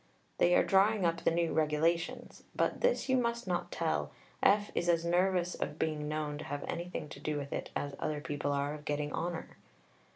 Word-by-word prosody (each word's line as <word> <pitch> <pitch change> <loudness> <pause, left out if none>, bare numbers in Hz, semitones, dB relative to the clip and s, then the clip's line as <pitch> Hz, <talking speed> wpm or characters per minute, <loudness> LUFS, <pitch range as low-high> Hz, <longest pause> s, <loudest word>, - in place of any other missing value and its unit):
They 175 +1 +5
are - - +5
drawing 195 0 +4
up 165 0 +1
the - - +4
new 170 0 +1
Regulations 160 +2 0
(but - - 0
this - - +2
you 260 -1 +3
must 235 -1 0
not 180 -2 -2
tell. 75 - -1 0.3
F. 205 +1 +4
is 175 - 0
as 170 -1 +3
nervous 180 0 +2
of 150 - -4
being 155 -2 -1
known 150 -1 -2
to - - -5
have 145 +1 -4
anything 175 -2 -4
to - - -9
do 150 -1 -2
with 140 -1 -4
it - - -3
as 145 -1 -2
other 155 -1 -1
people 145 -1 -2
are 140 +1 0
of 150 -1 -8
getting 145 0 -1
honour).... 170 0 -4
165 Hz, 200 wpm, -32 LUFS, 150-180 Hz, 0.3 s, They